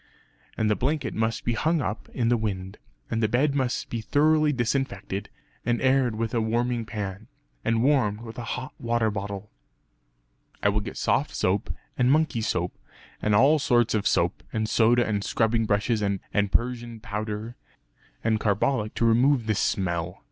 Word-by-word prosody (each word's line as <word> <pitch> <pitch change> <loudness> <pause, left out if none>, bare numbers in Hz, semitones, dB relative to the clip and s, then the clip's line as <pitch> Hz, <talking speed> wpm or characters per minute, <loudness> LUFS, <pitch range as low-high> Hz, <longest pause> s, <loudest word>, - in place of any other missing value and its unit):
And 110 - +1
the 105 - +3
blanket 145 +6 -1
must 110 +1 -1
be 120 - +1
hung 160 +7 +1
up 105 -4 -4
in 115 -2 0
the 120 - +4
wind; 100 -3 -3 0.3
and 115 0 0
the 110 - +3
bed 135 +6 +2
must 130 -3 -1
be 115 - -2
thoroughly 155 +5 +3
disinfected, 120 -6 -2 0.3
and 120 -1 +1
aired 130 -3 +2
with 115 0 -2
a 115 - +2
warming 120 +1 0
pan; 105 -1 -5 0.4
and 115 0 +1
warmed 125 -7 +2
with 115 +1 -8
a - - -4
hot 130 +3 -7
water 115 -2 +1
bottle." 100 0 -5 1.1
"I - - +5
will - - +1
get - - -7
soft - - 0
soap, - - 0 0.3
and 125 +1 +4
monkey 155 -6 +2
soap, 90 -4 -1 0.5
and 105 -1 +2
all 140 +8 +5
sorts 120 -4 +2
of 105 -2 +1
soap; - - +1
and 110 0 -1
soda 120 +2 +4
and 105 -2 -1
scrubbing 115 +1 +1
brushes; 105 +2 +1
and 100 -1 0 0.3
persian 120 -1 -1
powder; 110 0 -4 0.7
and 110 -1 +2
carbolic 105 +2 0
to 115 - +1
remove 120 +2 +4
the 110 - +1
smell. 90 -3 -1
115 Hz, 170 wpm, -26 LUFS, 105-125 Hz, 1.1 s, I